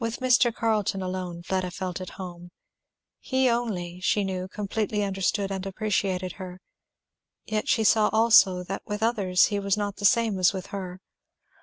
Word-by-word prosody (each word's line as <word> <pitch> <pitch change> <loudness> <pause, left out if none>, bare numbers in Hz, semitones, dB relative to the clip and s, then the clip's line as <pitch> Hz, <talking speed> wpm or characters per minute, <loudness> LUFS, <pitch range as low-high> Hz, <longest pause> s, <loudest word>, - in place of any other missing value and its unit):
With 230 0 -2
Mr. 250 -2 +3
Carleton 215 -4 -1
alone 180 -2 -5
Fleda 185 0 -1
felt 185 0 -5
at 185 - -9
home. 175 -2 -8 0.7
He 260 0 +1
only, 200 -8 -2
she 200 +2 +1
knew, 185 -1 -3
completely 210 +1 -2
understood 195 0 -1
and 190 -1 -3
appreciated 195 -2 -1
her. 185 -1 -8 0.9
Yet 215 -1 -2
she 225 - +3
saw 215 0 +4
also 220 -5 +5
that 195 +2 -5
with 210 0 -4
others 200 -6 +3
he 205 - 0
was 200 0 0
not 205 -1 -3
the 200 - -3
same 220 -1 +3
as 180 +1 +4
with 190 -1 -5
her. 185 -2 -5
195 Hz, 165 wpm, -26 LUFS, 185-215 Hz, 0.9 s, also